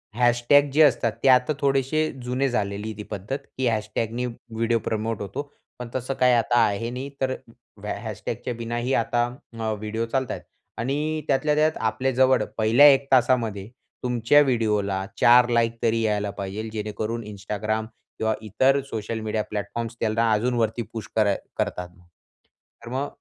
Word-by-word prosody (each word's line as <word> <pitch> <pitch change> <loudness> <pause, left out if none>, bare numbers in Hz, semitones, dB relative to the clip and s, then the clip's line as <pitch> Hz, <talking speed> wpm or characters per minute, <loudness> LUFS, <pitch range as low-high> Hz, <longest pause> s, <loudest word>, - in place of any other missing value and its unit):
Hashtag 120 +4 +4
जे 155 - +4
असतात 120 -5 +3
ते - - +3
आता 125 +4 +5
थोडेसे 140 +3 +1
जुने 130 +2 0
झालेली 105 -2 -2
आहे 110 - -7
ती 105 - -6
पद्धत, 105 +7 -3 0.2
की 130 -1 +1
हॅशटॅगनी 115 +2 -1
व्हिडिओ 115 -1 -2
प्रमोट 110 -1 -2
होतो. 140 +9 -5 0.3
पण 125 - -6
तसं 130 +1 -2
काही 125 -1 +3
आता 120 0 +2
आहे 105 +3 -2
नाही. 130 +3 -5
तर 130 0 +1 0.5
हॅ - - -2
हॅशटॅगच्या 125 - -4
बिनाही 120 +2 -2
आता 120 +1 +1 0.4
अ, 110 -1 -1
व्हिडिओ 110 +2 -3
चालतायेत 130 +2 -2 0.4
आणि 150 +6 -1
त्यातल्या 150 +2 +2
त्यात 155 +1 +2
आपल्या 120 +4 0
जवळ 130 0 +4
पहिल्या 115 +6 +6
1 135 0 +2
तासामध्ये 115 -6 +2 0.4
तुमच्या 125 +4 +4
व्हिडिओला 105 -7 0
4 120 +1 +7
लाइक 115 -1 +1
तरी 115 0 +2
यायला 105 -2 0
पाहिजे, 100 +3 -4
जेणेकरून 110 +1 -4
Instagram 105 +2 -3 0.3
किंवा 110 0 +1
इतर 130 +6 +2
सोशल 110 -2 -4
मीडिया 110 -1 -2
प्लॅटफॉर्म्स 110 +3 -4
त्यांना 115 0 +1
अजून 120 +4 +1
वरती 115 +1 0
पुश 110 -4 -6
कर 105 -2 +3 0.2
करतात. 90 0 -2
तर 90 -1 -26 0.6
मग 135 +3 -2
115 Hz, 155 wpm, -24 LUFS, 110-130 Hz, 0.6 s, 4